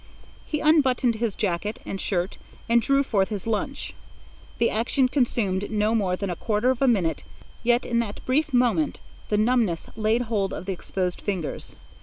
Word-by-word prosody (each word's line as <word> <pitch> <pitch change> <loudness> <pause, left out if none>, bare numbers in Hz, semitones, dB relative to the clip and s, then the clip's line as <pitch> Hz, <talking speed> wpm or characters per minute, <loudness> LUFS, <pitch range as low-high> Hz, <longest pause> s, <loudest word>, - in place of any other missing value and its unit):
He 300 - -2
unbuttoned 265 -6 +3
his 225 -3 -1
jacket 205 +1 -1
and 195 - -4
shirt 180 0 -2 0.3
and 235 0 +4
drew 275 +4 +3
forth 200 -7 +1
his 205 -4 -4
lunch. 225 +5 -3 0.6
The 230 - +2
action 255 +4 +2
consumed 220 -7 0
no 215 0 +1
more 195 -5 +1
than 195 0 -3
a - - -3
quarter 215 +7 +1
of 260 - -3
a 270 - +4
minute, 190 -9 +2 0.4
yet 240 +1 +2
in 235 -1 +1
that 215 -3 -4
brief 290 +4 +1
moment 250 +4 +2 0.3
the 210 - +2
numbness 215 -6 +1
laid 220 +2 +1
hold 210 -5 -1
of - - -6
the 195 - -2
exposed 180 0 -3
fingers. 185 -7 -4
220 Hz, 175 wpm, -25 LUFS, 195-245 Hz, 0.6 s, and